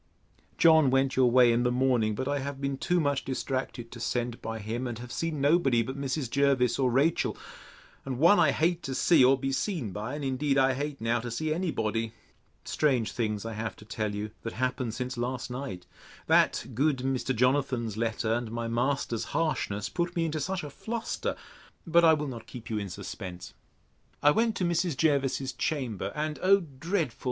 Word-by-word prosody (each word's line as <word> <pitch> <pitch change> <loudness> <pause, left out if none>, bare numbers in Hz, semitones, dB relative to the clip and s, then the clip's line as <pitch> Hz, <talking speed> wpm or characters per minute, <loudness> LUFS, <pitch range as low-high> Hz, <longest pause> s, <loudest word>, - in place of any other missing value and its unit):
John 160 -4 +6
went 135 +1 +2
your 130 -1 +4
way 125 -1 +6
in 120 - +2
the 125 0 +2
morning; 125 -4 +2
but 130 +4 -3
I 145 0 0
have 140 0 -5
been 140 0 -1
too 175 +6 0
much 145 -3 0
distracted 130 -2 -3
to 120 - -9
send 120 0 -2
by 115 0 -4
him; 115 +4 -4
and 120 -2 -5
have 120 +1 -9
seen 165 0 -2
nobody 140 -5 +3
but 130 +4 -5
Mrs. 140 0 -2
Jervis 135 -1 +2
or 130 -2 +3
Rachel, 140 +7 +1 0.7
and 130 -2 -4
one 170 +9 +6
I - - +5
hate 170 +2 +1
to 135 - -4
see 165 -2 +5
or 135 +2 +5
be 135 +1 -2
seen 140 - -2
by 105 +8 -4
and 145 -1 -4
indeed 135 +1 0
I 135 -1 +4
hate 140 0 -4
now 115 +1 +1
to 120 +1 -5
see 155 +7 -1
any 180 +2 -1
body. 115 -3 -2 0.5
Strange 130 -7 +1
things 105 -3 -2
I 115 - -4
have 110 0 -4
to 105 - -15
tell 105 -1 -3
you, 105 +1 -4
that 115 - -5
happened 125 -2 -2
since 125 -1 -4
last 125 +1 -3
night, 125 -9 -6 0.4
that - - +3
good 140 +3 +2
Mr. 130 0 -1
Jonathan's 125 -3 +1
letter, 110 0 -1
and 120 -1 -2
my 115 0 -3
master's 120 0 -1
harshness, 105 -11 -1
put 175 +1 -2
me 170 -1 +1
into 155 -1 -2
such 185 +4 -2
a 145 - -7
fluster; 230 +9 -3 0.5
but 170 0 +4
I 160 -1 +7
will 150 0 -3
not 120 -4 -7
keep 120 -2 -9
you 110 - 0
in 100 -2 -5
suspense. 90 0 -7 0.7
I 145 - +7
went 225 +6 +1
to 185 - 0
Mrs. 170 -3 0
Jervis's 135 -2 +1
chamber; 115 - -2
and, 150 -2 -2
O 195 +1 +5
dreadful! 160 - -3
130 Hz, 200 wpm, -28 LUFS, 115-150 Hz, 0.7 s, I